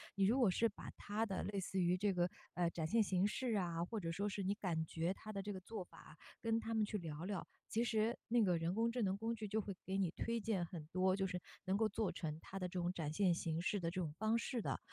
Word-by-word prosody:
你 195 - +2
如 230 +7 +5
果 235 -7 +6
是 230 +5 +3
把 205 - -9
它 210 +2 -1
的 195 -4 -2
类 200 -1 -1
似 190 0 0
于 175 +1 +3
这 200 +1 +2
个， 175 0 +2 0.2
呃， 175 -1 +2
展 160 -2 -2
现 225 +5 +4
形 190 -1 +3
式 230 +1 0
啊， 170 -3 0
或 215 +5 -2
者 165 -2 -2
说 200 +4 0
是 195 0 -2
你 195 - +2
感 170 -6 0
觉 165 +3 0
它 215 +2 -8
的 200 - -2
这 205 +1 -4
个 190 - -4
做 205 +1 -5
法 - - -17
啊， 155 - -13 0.3
跟 225 -1 +2
它 225 0 -3
们 220 -1 +3
去 210 - -2
聊 165 -3 -5
聊， 195 -3 -2 0.2
其 230 - +1
实 225 0 +2
那 235 -1 +4
个 180 -3 +4
人 165 +2 0
工 230 +1 +3
智 245 +1 -1
能 195 -2 +2
工 225 +2 -1
具 215 -1 -4
就 215 +2 +1
会 200 -1 -5
给 190 +1 -1
你 185 -4 +2
推 230 +4 -1
荐 205 -5 0
很 160 -2 -7
多， 185 +1 +3
就 195 0 +1
是 180 -1 -3 0.2
能 190 +1 +2
够 220 0 +3
做 215 -1 0
成 155 -2 -3
它 195 - -6
的 180 - -1
这 180 0 -3
种 175 0 +1
展 155 -4 -2
现 185 +1 +4
形 165 -1 -1
式 200 +2 +1
的 165 - 0
这 185 - -2
种 155 -4 -2
方 220 +2 +3
式 235 0 -1
的， - - -1
195 Hz, 305 characters per minute, -39 LUFS, 175-220 Hz, 0.3 s, 果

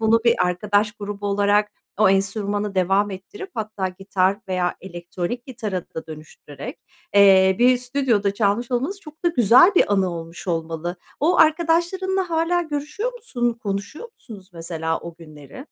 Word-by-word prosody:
bunu 225 +1 +3
bir 235 0 +5
arkadaş 205 +3 0
grubu 205 -1 -6
olarak 205 +1 +2 0.3
o 215 -2 +5
enstrümanı 200 +1 0
devam 195 +3 +2
ettirip, 190 - -9
hatta 215 -3 -3
gitar 190 +1 0
veya 180 -1 -1
elektronik 180 +6 -6
gitara 220 -8 -4
da 160 - -6
dönüştürerek, 155 -2 -10 0.4
eee, 190 -2 +6
bir 250 +1 +5
stüdyoda 245 -6 0
çalmış 215 +3 0
olmanız 275 +11 -2
çok 310 -1 -15
da - - +5
güzel 255 - +5
bir 205 - +3
anı 190 -2 +2
olmuş 165 +2 -9
olmalı. 165 +1 -3 0.2
O 335 +5 +2
arkadaşlarınla 345 +3 +2
hâlâ 330 +2 +1
görüşüyor 310 +10 -4
musun? 250 - -2
Konuşuyor 205 - -5
musunuz 210 - -13
mesela 165 -1 -3
o 170 -1 -9
günleri? 155 - -12
205 Hz, 145 wpm, -22 LUFS, 185-260 Hz, 0.4 s, eee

